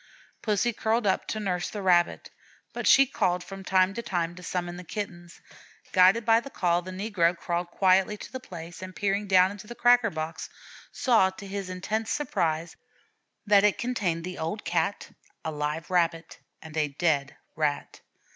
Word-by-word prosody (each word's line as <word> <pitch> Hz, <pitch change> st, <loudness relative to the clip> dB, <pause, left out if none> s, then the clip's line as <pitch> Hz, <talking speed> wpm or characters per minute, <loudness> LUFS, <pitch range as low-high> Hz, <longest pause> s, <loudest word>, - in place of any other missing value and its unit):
Pussy 220 Hz, +2 st, +1 dB
curled 220 Hz, +2 st, 0 dB
up 190 Hz, -, +1 dB
to 215 Hz, -, -3 dB
nurse 180 Hz, -4 st, -2 dB
the 205 Hz, -2 st, -6 dB
Rabbit, 175 Hz, -2 st, +2 dB, 0.4 s
but -, -, -3 dB
she 275 Hz, -, +7 dB
called 180 Hz, -8 st, 0 dB
from 195 Hz, 0 st, -9 dB
time 185 Hz, 0 st, +3 dB
to 235 Hz, -, -4 dB
time 175 Hz, -6 st, -2 dB
to 180 Hz, -, -12 dB
summon 175 Hz, 0 st, -3 dB
the 180 Hz, -, -8 dB
Kittens. 175 Hz, -2 st, -7 dB, 0.5 s
Guided 190 Hz, +5 st, +5 dB
by 225 Hz, 0 st, +5 dB
that 275 Hz, +3 st, -11 dB
call, 175 Hz, -1 st, +2 dB
the 185 Hz, -, -9 dB
negro 185 Hz, -3 st, 0 dB
crawled 175 Hz, +1 st, -2 dB
quietly 190 Hz, +3 st, +3 dB
to -, -, -10 dB
the 260 Hz, -, -5 dB
place, 170 Hz, -6 st, -10 dB
and 185 Hz, -1 st, -8 dB
peering 200 Hz, +4 st, -1 dB
down 185 Hz, 0 st, +5 dB
into 205 Hz, +1 st, -10 dB
the 240 Hz, -, -8 dB
cracker 240 Hz, -1 st, +4 dB
box, 160 Hz, -1 st, -5 dB, 0.4 s
saw, 225 Hz, -7 st, +3 dB
to 200 Hz, +2 st, -11 dB
his 195 Hz, -1 st, -5 dB
intense 215 Hz, +5 st, -3 dB
surprise, 170 Hz, -, -1 dB, 0.7 s
that 205 Hz, -1 st, +5 dB
it 210 Hz, -1 st, +3 dB
contained 200 Hz, -10 st, -1 dB
the 180 Hz, +1 st, -6 dB
old 165 Hz, +7 st, -4 dB
Cat, 170 Hz, +3 st, -1 dB, 0.3 s
a 160 Hz, -, -1 dB
live 150 Hz, +2 st, -3 dB
Rabbit, 170 Hz, -2 st, 0 dB, 0.2 s
and 160 Hz, -1 st, -11 dB
a 150 Hz, -1 st, +2 dB
dead 145 Hz, -1 st, -1 dB, 0.2 s
Rat. 150 Hz, -2 st, -2 dB
185 Hz, 175 wpm, -27 LUFS, 170-210 Hz, 0.7 s, she